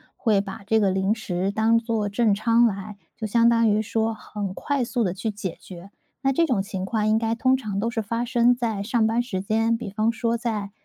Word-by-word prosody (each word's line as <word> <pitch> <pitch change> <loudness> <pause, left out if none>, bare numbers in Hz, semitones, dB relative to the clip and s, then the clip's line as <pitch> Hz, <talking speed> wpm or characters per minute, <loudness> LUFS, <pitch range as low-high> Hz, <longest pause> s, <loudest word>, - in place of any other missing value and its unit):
会 210 -4 +2
把 200 0 -8
这 220 +1 +2
个 200 -2 +3
零 190 +2 +1
食 195 -3 -2
当 220 +2 +3
做 225 -3 -1
正 215 0 +2
餐 230 +3 +3
来， 200 -1 -3 0.2
就 220 - -4
相 235 +2 +4
当 230 -1 +3
于 210 +1 +2
说 225 0 -1
很 205 -3 -6
快 280 -3 -1
速 240 0 -1
地 180 - 0
去 200 +4 -3
解 200 -4 -5
决。 185 +1 -11 0.3
那 270 0 +2
这 335 +5 +3
种 230 -9 +1
情 195 -2 -5
况 215 +1 -1
应 215 +1 +3
该 225 0 0
通 255 +2 +3
常 210 -7 -3
都 230 +3 0
是 225 - -2
发 230 +3 -2
生 245 0 +3
在 225 -5 -2
上 225 +2 +1
班 225 +2 +2
时 200 -7 -4
间， 225 +3 +1
比 215 -4 -7
方 215 +3 +1
说 230 +1 -1
在， 215 -4 -3
220 Hz, 250 characters per minute, -24 LUFS, 200-230 Hz, 0.3 s, 相